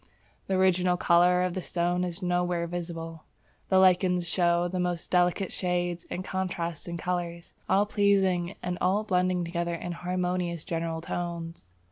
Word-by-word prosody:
The 190 - 0
original 185 -1 +3
colour 180 +1 +4
of 180 -1 -1
the 185 - -3
stone 175 +1 0
is 180 +1 -4
nowhere 175 -1 0
visible. 165 -2 -6 0.4
The 190 - +4
lichens 180 -1 +4
show 175 0 +2
the 185 +1 -3
most 175 -2 -2
delicate 180 +1 +2
shades 175 -1 -2
and 185 - -4
contrasts 175 -4 -3
in 170 0 -4
colour; 175 -1 -2 0.3
all 195 +2 +4
pleasing 195 -4 +2
and 180 0 -3
all 195 +4 +2
blending 180 -3 +1
together 170 0 -2
in 175 +1 -5
harmonious 180 -1 -2
general 165 -2 -3
tones. 170 - -5
175 Hz, 150 wpm, -28 LUFS, 170-185 Hz, 0.4 s, colour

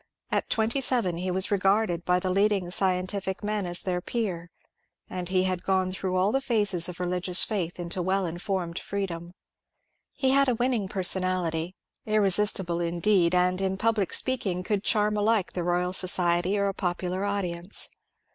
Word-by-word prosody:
At - - 0
twenty 230 +4 +1
seven 235 -10 +1
he 185 +2 -3
was 185 +2 +2
regarded 195 -2 +2
by 180 0 +3
the 185 0 -2
leading 195 -2 +1
scientific 190 +1 -1
men 210 -2 -1
as 175 0 +2
their 180 -1 -1
peer, 180 -7 -3 0.6
and 180 -1 -5
he 185 -1 +2
had 185 -1 -1
gone 190 -1 +1
through 185 0 -3
all 185 +3 +2
the 270 - +1
phases 205 -9 +1
of 180 - -8
religious 180 0 +2
faith 180 -5 -2
into 175 +1 -3
well 190 +2 0
informed 175 0 -3
freedom. 175 -3 -5 0.8
He 265 -2 +1
had 275 0 +4
a 245 - +2
winning 240 -4 0
personality, 185 -3 -1 0.3
irre 215 -2 +3
sistible 175 -4 +1
indeed, 175 +1 +2
and 180 +1 +3
in 190 0 -1
public 215 -3 +1
speaking 195 -9 0
could 205 0 -1
charm 210 -1 +1
alike 210 -2 +1
the 180 - -2
Royal 180 +1 0
Society 180 +1 +1
or 200 - +1
a 195 - 0
popular 180 0 -2
audience. 185 -2 -2
185 Hz, 165 wpm, -27 LUFS, 180-205 Hz, 0.8 s, had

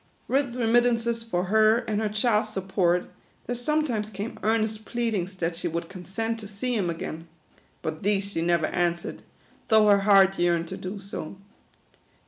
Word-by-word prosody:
With 270 -2 0
remittances 235 -1 +2
for 205 -6 -1
her 215 +3 +4
and 220 -3 -2
her 215 - 0
child's 215 0 +1
sup 190 -2 -5
port, 180 -2 +1 0.3
there 245 - -2
sometimes 245 -4 0
came 205 +2 -6
earnest 220 0 0
pleadings 215 -6 -2
that 170 -2 -2
she 175 +1 -3
would 170 0 -3
consent 200 +5 -4
to 210 - -8
see 225 +5 -2
him 190 -6 0
again; 165 0 -5 0.6
but 155 0 -4
these 200 0 0
she 165 - -2
never 170 -1 +2
answered, 175 0 -1 0.5
though 220 -2 +5
her 200 -1 +6
heart 195 -1 +5
yearned 170 -1 +2
to - - -5
do 185 +3 -6
so. 195 -4 -7
205 Hz, 165 wpm, -26 LUFS, 180-225 Hz, 0.6 s, her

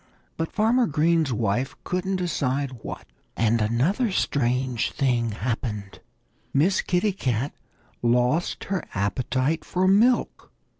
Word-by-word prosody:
But 165 0 -3
Farmer 230 +3 +3
Green's 160 0 +2
wife 115 +3 -1
couldn't 185 +1 -1
decide 140 -7 -1
what. - - -7 0.3
And 115 0 +2
another 140 - +1
strange 125 -6 0
thing 120 -4 +1
happened. 105 -2 -4 0.6
Miss 170 +8 +3
Kitty 185 +3 +1
Cat 130 - -1 0.5
lost 125 +7 +1
her 195 -2 -2
appetite 130 - 0
for 185 +1 0
milk. 225 +6 +2
135 Hz, 110 wpm, -25 LUFS, 120-180 Hz, 0.6 s, Farmer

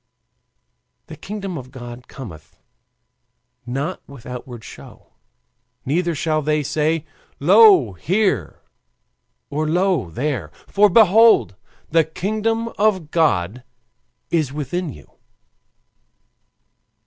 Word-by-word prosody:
"The 160 - -10
kingdom 195 0 -6
of 130 0 -11
God 120 -1 -10
cometh 85 - -11 1.1
not 140 +8 -3
with 140 -4 -13
outward 125 -2 -8
show; - - -13 0.7
neither 170 +4 0
shall 155 0 0
they 150 0 0
say, 155 +2 0 0.3
Lo 185 - +6
here! 190 - -1 0.9
or, 155 +2 -1
Lo 180 - +1
there! 120 - -3 0.2
for 205 +1 +4
behold, 210 - +5 0.4
the 165 0 +4
kingdom 215 +8 -2
of 190 -7 +1
God 125 - +1 0.7
is 155 -6 +1
within 150 +4 -3
you." 75 - -14
155 Hz, 95 wpm, -20 LUFS, 130-190 Hz, 1.1 s, Lo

